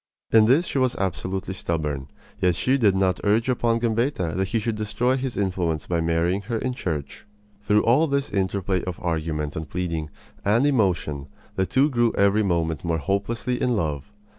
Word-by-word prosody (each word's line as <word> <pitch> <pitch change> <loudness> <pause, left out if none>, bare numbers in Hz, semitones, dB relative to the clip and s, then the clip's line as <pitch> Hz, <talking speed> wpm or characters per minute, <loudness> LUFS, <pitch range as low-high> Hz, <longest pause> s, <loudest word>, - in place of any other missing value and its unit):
In 110 -1 +6
this 135 +10 +4
she 140 - -1
was 130 -2 +1
absolutely 95 0 -3
stubborn, 75 -7 -3 0.3
yet 90 -3 +2
she 130 +9 +2
did 105 -8 +3
not 95 -2 +1
urge 110 +3 +2
upon 120 -2 +1
Gambetta 115 - 0
that 95 +1 0
he 115 - -1
should 115 +1 -1
destroy 110 +4 0
his 130 -4 -3
influence 90 -5 -1
by 85 -2 0
marrying 85 +4 +1
her 115 +3 -3
in 125 +3 -2
church. 80 - -5 0.3
Through 105 +1 +2
all 135 +8 +4
this 140 -1 -1
interplay 95 -1 -1
of 90 -2 -5
argument 80 -3 -2
and 80 -1 -5
pleading 85 -3 -3 0.3
and 115 +7 +3
emotion 90 - +1 0.3
the 95 -1 0
two 135 +2 +3
grew 120 -2 +2
every 100 +2 +4
moment 85 -6 0
more 85 -1 0
hopelessly 115 - -2
in 125 -1 +2
love. 75 -3 -2
100 Hz, 180 wpm, -24 LUFS, 85-115 Hz, 0.3 s, In